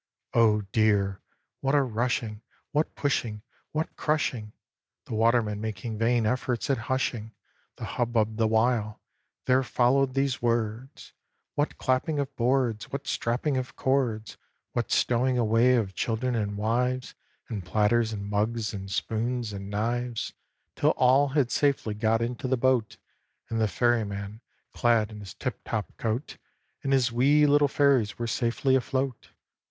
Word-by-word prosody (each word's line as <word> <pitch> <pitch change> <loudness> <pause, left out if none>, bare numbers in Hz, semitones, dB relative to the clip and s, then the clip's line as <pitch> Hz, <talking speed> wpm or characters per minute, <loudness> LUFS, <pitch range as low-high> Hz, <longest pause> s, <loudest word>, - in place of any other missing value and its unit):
Oh, 110 -2 +4
dear! 100 -3 +2 0.4
what 135 +1 +1
a 145 - +4
rushing, 115 -2 -2 0.3
what 150 +2 0
pushing, 115 -7 -1 0.3
what 155 +1 -3
crushing 130 -8 -1 0.5
(The - - -7
watermen 110 -2 +2
making 110 0 -4
vain 115 0 +2
efforts 125 +3 0
at 135 - +1
hushing 120 -4 -1 0.4
The - - -6
hubbub 115 -3 0
the 110 -1 +3
while) 110 -1 +1 0.5
there 130 +1 +4
followed 130 +1 +2
these 135 -1 0
words! 120 +3 -2 0.4
What 145 +1 -1
clapping 130 +4 0
of 140 -1 -3
boards! 120 -3 0
What 140 0 -4
strapping 130 +4 -1
of 130 -1 -4
cords! 120 -6 0 0.3
What 120 - -2
stowing 125 +1 +2
away 115 +2 +4
of 105 -5 0
children 120 +5 -1
and 105 -3 -2
wives, 125 +4 0 0.3
And 105 -5 -5
platters, 110 +4 +2
and 100 -2 -5
mugs, 105 +2 -1
and 95 -1 -6
spoons, 115 +2 -2
and 100 0 -6
knives! 120 +3 -2 0.4
Till - - +2
all 130 +3 +5
had 135 -3 +1
safely 140 -7 +1
got 110 +2 +1
into 125 +3 -3
the 130 0 +1
boat, 125 -3 +1 0.5
And 115 0 0
the 110 - +3
Ferryman, 105 -2 -1 0.3
clad 115 -3 +2
in 105 - -9
his 100 -3 -9
tip - - -4
top 110 -2 -4
coat, 115 +5 -3 0.4
And 135 - -2
his 130 -3 +3
wee 140 +5 +4
little 145 0 +4
Fairies 140 -7 +2
were 120 - -2
safely 120 +3 +1
afloat! 130 -1 -2
120 Hz, 145 wpm, -27 LUFS, 110-130 Hz, 0.5 s, all